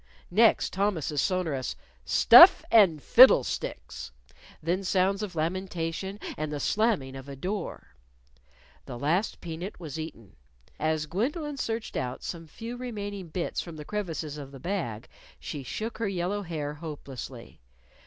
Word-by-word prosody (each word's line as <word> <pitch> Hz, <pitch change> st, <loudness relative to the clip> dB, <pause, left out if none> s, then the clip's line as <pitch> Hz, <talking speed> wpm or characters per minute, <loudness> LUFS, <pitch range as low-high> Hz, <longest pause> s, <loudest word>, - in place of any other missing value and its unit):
Next, 220 Hz, +5 st, +4 dB
Thomas's 180 Hz, -7 st, 0 dB
sonorous, 165 Hz, -9 st, -1 dB, 0.3 s
"Stuff -, -, +8 dB
and 185 Hz, -10 st, +5 dB
fiddle 250 Hz, -, +8 dB
sticks!" 60 Hz, -, -5 dB, 0.5 s
then 175 Hz, +5 st, -1 dB
sounds 190 Hz, +2 st, +1 dB
of 200 Hz, -4 st, -5 dB
lamentation, 180 Hz, +3 st, -3 dB, 0.2 s
and 155 Hz, 0 st, -3 dB
the 145 Hz, -, -3 dB
slamming 200 Hz, -, 0 dB
of 135 Hz, +1 st, -9 dB
a 140 Hz, -, -6 dB
door. 180 Hz, -, -5 dB, 0.9 s
The 125 Hz, -, -6 dB
last 165 Hz, -, 0 dB
peanut 175 Hz, +3 st, -6 dB
was 160 Hz, -3 st, -6 dB
eaten. 145 Hz, -, -8 dB, 0.4 s
As 155 Hz, 0 st, 0 dB
Gwendolyn 280 Hz, -, -2 dB
searched 225 Hz, -3 st, -3 dB
out 125 Hz, -1 st, -3 dB
some 165 Hz, -2 st, -6 dB
few 230 Hz, +9 st, -7 dB
remaining 205 Hz, -6 st, -5 dB
bits 170 Hz, +2 st, -3 dB
from 170 Hz, -2 st, -9 dB
the 150 Hz, -1 st, -8 dB
crevices 165 Hz, -7 st, -4 dB
of 140 Hz, -1 st, -9 dB
the 135 Hz, -, -11 dB
bag, 130 Hz, -, -3 dB, 0.3 s
she 145 Hz, -, -6 dB
shook 220 Hz, -, -5 dB
her 225 Hz, -, 0 dB
yellow 190 Hz, +2 st, -2 dB
hair 155 Hz, -5 st, -4 dB
hopelessly. 145 Hz, -, -9 dB
170 Hz, 140 wpm, -28 LUFS, 150-205 Hz, 0.9 s, Stuff